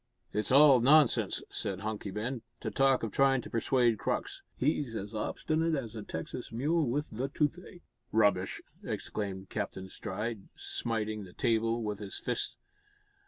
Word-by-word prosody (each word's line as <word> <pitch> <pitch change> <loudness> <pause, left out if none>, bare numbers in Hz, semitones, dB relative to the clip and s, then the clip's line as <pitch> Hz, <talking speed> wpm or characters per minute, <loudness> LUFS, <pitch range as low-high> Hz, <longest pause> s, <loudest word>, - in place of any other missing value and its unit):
"It's 105 +5 -1
all 140 -1 +8
nonsense," 145 +1 +4
said 95 -1 -3
Hunky 105 -1 -3
Ben, 115 +5 -3 0.2
"to - - -3
talk 135 -2 +3
of 110 - -2
tryin' 135 +1 +4
to - - -10
persuade 115 -1 +2
Crux. - - -2 0.2
He's 135 -3 0
as 105 +1 -5
obstinate 155 +9 0
as 120 -6 -4
a 110 - -4
Texas 90 +8 -6
mule 150 +6 +1
wi' 145 +5 +1
the 125 +5 -2
toothache." 160 +5 -2 0.3
"Rubbish!" 100 -4 +2 0.2
exclaimed 95 -2 -4
Captain 95 -3 -4
Stride, 105 +1 -4
smiting 110 -2 -2
the 90 -2 -12
table 115 0 +1
with 105 -2 -3
his 100 -2 -5
fist. - - -2
115 Hz, 150 wpm, -31 LUFS, 105-135 Hz, 0.3 s, all